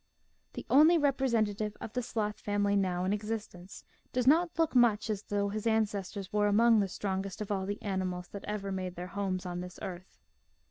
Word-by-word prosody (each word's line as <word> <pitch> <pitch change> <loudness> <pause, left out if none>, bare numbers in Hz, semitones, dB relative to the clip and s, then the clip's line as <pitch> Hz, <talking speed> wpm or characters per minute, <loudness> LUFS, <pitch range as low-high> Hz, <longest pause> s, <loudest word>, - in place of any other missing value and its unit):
The - - -7
only 310 +5 +6
representative 230 -8 +1
of 220 - -7
the 250 - 0
sloth 215 -3 -3
family 205 0 0
now 185 -2 +1
in 190 - +1
existence 210 -3 -5 0.3
does 250 -1 0
not 335 +5 +4
look 325 -1 +2
much 225 -3 +4
as 205 -2 -3
though 205 -1 -1
his 215 +2 -3
ancestors 205 -3 -1
were 210 0 +3
among 225 +2 +5
the 200 - +1
strongest 190 0 -3
of 210 -1 -4
all 190 -1 -1
the 205 +1 -3
ani 190 -3 -1
mals 180 -1 -4
that 200 - -7
ever 200 -2 -3
made 185 -1 -4
their 180 +1 -6
homes 195 -2 -2
on 175 0 -4
this 180 0 -8
earth. 185 0 -8
205 Hz, 195 wpm, -31 LUFS, 190-220 Hz, 0.3 s, only